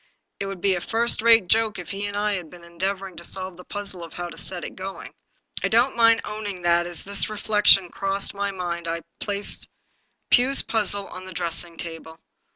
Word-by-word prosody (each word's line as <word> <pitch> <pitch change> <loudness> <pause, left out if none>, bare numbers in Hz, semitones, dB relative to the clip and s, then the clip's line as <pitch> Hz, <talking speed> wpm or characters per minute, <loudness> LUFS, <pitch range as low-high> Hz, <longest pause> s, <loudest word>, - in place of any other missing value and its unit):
It 195 - -2
would 195 -2 -6
be 195 0 +3
a 175 - -2
first 230 +2 +1
rate 230 -3 +6
joke 220 +1 +2
if 180 - -7
he 200 +1 -3
and 205 0 -4
I 210 0 +1
had 180 -5 -4
been 175 +1 -13
en 170 0 -16
deavoring 190 -1 -2
to 170 - -8
solve 185 0 -3
the 180 - -12
puzzle 200 -4 -6
of 165 - -10
how 175 0 -4
to - - -10
set 180 -2 -4
it - - -7
going." 190 +1 -7 0.5
I - - +3
don't 240 +4 +3
mind 230 -1 +5
owning 205 -4 -5
that 175 0 +3
as 175 -1 -4
this 200 +1 +1
reflection 210 -3 +5
crossed 195 +2 -1
my 200 0 -1
mind 175 -3 -4
I 165 0 -2 0.2
replaced 205 0 -2 0.6
Pugh's 265 +2 +6
puzzle 205 -2 0
on 185 +1 -9
the 185 - -8
dressing 170 -1 -3
table. 165 -1 -7
195 Hz, 210 wpm, -24 LUFS, 175-205 Hz, 0.6 s, rate